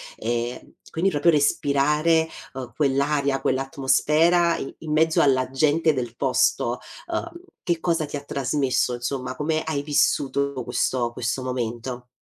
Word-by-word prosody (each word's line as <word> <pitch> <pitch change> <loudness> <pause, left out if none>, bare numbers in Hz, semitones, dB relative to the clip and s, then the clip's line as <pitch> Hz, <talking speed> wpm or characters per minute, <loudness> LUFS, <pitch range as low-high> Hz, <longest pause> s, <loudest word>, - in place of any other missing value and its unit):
ehm, 120 +2 -4
quindi 180 +4 +1
proprio 165 +2 +3
respirare, 150 +2 +2 0.2
uhm, 130 -2 -7
quell'aria, 140 -1 +1
quell'atmosfera 150 +6 +2
i 135 - -6
in 155 -2 -6
mezzo 160 +1 +3
alla 130 -2 +2
gente 155 +4 +2
del 120 -3 -4
posto, 125 -2 +1 0.3
ehm, 340 - -2 0.3
che 170 -2 0
cosa 165 -3 0
ti 145 - -7
ha 140 - -4
trasmesso 135 -2 0
insomma, 125 +1 -4
come 155 +3 -1
hai 155 -3 -2
vissuto 140 -1 +1
questo 120 -1 -1
questo 120 +2 -3
momento? 125 0 -4
140 Hz, 135 wpm, -24 LUFS, 130-155 Hz, 0.3 s, proprio